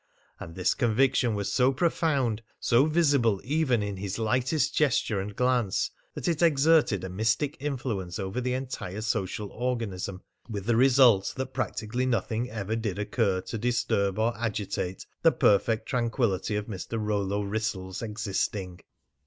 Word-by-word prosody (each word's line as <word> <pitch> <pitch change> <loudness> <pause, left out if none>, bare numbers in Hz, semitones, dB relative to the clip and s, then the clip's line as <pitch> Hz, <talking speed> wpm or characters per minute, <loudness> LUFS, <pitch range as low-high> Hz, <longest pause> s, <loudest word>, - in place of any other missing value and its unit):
And 85 - -9
this 90 - +1
conviction 120 0 +2
was 100 -1 -2
so 130 0 +4
profound, 135 -6 0 0.2
so 125 +5 +3
visible 140 - +3
even 130 -3 +1
in 100 -1 -4
his 95 +1 -4
lightest 130 +7 +1
gesture 125 -8 +1
and 100 +1 -6
glance, 125 -5 +1 0.2
that - - -4
it 170 -2 0
exerted 155 - +4
a - - -3
mystic 110 +9 0
influence 120 -11 -3
over 95 +4 -3
the 125 0 -1
entire 125 -6 -5
social 105 -1 -2
organism, 105 -6 -3 0.3
with 100 -4 -4
the 120 0 +2
result 125 -5 +5
that 130 0 -4
practically 120 0 -2
nothing 120 0 -1
ever 110 -2 -3
did 110 -4 -3
occur 105 -2 0
to 115 - -6
disturb 115 -4 0
or 115 +1 +1
agitate 100 -5 -3 0.2
the - - +6
perfect 110 +2 +2
tranquillity 115 -5 0
of 105 0 -2
Mr. 105 +2 -5
Rollo 105 -1 -1
Wrissell's 100 -3 -3
existing. 100 -4 -3
115 Hz, 145 wpm, -27 LUFS, 100-130 Hz, 0.3 s, the